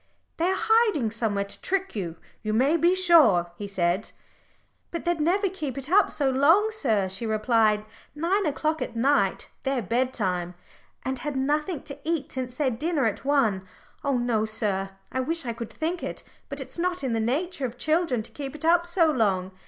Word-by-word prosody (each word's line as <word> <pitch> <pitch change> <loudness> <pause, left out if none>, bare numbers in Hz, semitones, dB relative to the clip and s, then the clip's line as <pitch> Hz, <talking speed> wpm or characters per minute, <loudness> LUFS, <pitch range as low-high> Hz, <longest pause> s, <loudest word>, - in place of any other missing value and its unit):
"They 330 - +1
are 380 - +1
hiding 435 - +3
somewhere 215 -3 -1
to 200 - -7
trick 385 -4 -1
you, 175 -5 -3 0.3
you 215 0 -2
may 265 +8 +3
be 345 +2 +3
sure," 315 - +5
he 205 +3 -6
said. 185 +1 -1 0.8
"But 335 - -5
they'd 345 -2 0
never 380 +6 +2
keep 310 -8 -5
it 275 +3 -5
up 405 +2 +5
so 285 - 0
long, 330 +12 +4
sir," 225 - +1
she 195 +5 -1
replied. 215 -1 +2 0.3
"Nine 355 +5 +1
o'clock 310 +2 -1
at 235 - -4
night 230 -5 +1
their 265 -3 -1
bedtime, 190 -6 -1 0.5
and 260 0 -2
had 295 +2 -4
nothing 295 +4 -1
to 280 0 -9
eat 325 -3 -2
since 255 -1 -5
their 270 -2 +1
dinner 290 +3 0
at 220 - -1
one. 225 -10 +1 0.4
Oh 280 -3 +1
no, 240 -3 +1
sir 210 -3 -1 0.2
I 260 - -2
wish 325 +3 0
I 235 - -2
could 230 -1 -7
think 335 +3 -3
it - - -5 0.3
but - - -5
it's - - -7
not 360 -2 -1
in 255 -3 -1
the 225 - 0
nature 275 +5 -1
of 240 0 -11
children 310 -4 +1
to - - -8
keep 280 -1 -6
it 305 - -5
up 345 +1 +4
so 345 -1 +3
long. 195 -8 +1
265 Hz, 190 wpm, -26 LUFS, 220-330 Hz, 0.8 s, sure